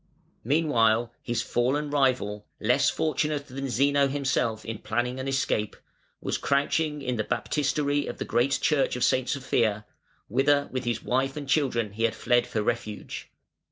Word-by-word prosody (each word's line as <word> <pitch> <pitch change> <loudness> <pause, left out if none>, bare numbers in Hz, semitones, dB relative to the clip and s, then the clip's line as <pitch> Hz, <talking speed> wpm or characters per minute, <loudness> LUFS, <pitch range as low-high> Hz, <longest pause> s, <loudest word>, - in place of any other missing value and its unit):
] - - -39
Meanwhile 120 -7 +2
his 120 - -2
fallen 145 +5 0
rival, 125 -7 +1
less - - +3
fortunate 150 -1 -1
than 135 0 -5
Zeno 140 +2 +3
himself 135 -5 -1
in 115 -2 -5
planning 120 +3 -2
an 130 - -4
escape, 135 -6 0 0.4
was - - -2
crouching 145 +1 0
in 125 -2 -1
the 110 - 0
baptistery 145 +3 0
of - - -5
the - - -4
great 125 +4 +2
Church 150 -5 +2
of 125 - -1
Saint 130 -1 +2
Sophia, 115 -6 0 0.4
whither 140 +5 +2
with 130 -1 -3
his 120 -2 -1
wife 135 +3 0
and 145 -2 -5
children 125 -7 +1
he 115 +2 0
had 115 - 0
fled 120 -1 +2
for 110 - -1
refuge. 110 -2 -4
130 Hz, 160 wpm, -27 LUFS, 115-140 Hz, 0.4 s, less